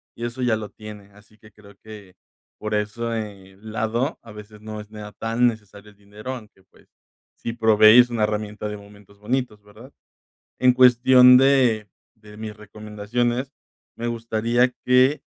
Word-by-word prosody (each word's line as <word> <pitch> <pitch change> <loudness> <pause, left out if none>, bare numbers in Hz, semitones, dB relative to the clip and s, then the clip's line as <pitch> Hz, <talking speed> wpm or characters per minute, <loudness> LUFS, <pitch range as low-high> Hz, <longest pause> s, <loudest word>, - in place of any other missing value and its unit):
y 120 - -5
eso 120 +2 -6
ya 120 -3 +1
lo 110 -1 -6
tiene. 105 -2 -12
Así 105 +1 -22
que 105 -1 -19
creo 100 -1 -18
que 105 -4 -13 0.4
por 110 0 -5
ese 105 -2 -4
lado, 110 +5 -3
a 115 - -13
veces 105 0 -13
no 110 0 -7
sea 105 -1 -10 0.2
necesario 105 -4 -2
el 105 - -25
dinero, 105 +5 -9
aunque 105 -5 -15
pues 95 - -26 0.5
si 115 - -5
probéis 110 +1 +6
una 115 -3 -1
herramienta 105 0 -3
de 105 0 -6
momentos 100 0 -18
bonitos, 115 -1 -3
¿verdad? 110 +6 -17 0.7
En 125 -1 +4
cuestión 125 0 +6
de 125 -6 +2 0.3
de 105 -1 -16
mis 110 -1 -8
recomendaciones, 110 +5 -4 0.4
me 120 +1 -4
gustaría 115 +2 0
que 130 +3 +3
110 Hz, 150 wpm, -22 LUFS, 105-120 Hz, 0.7 s, probéis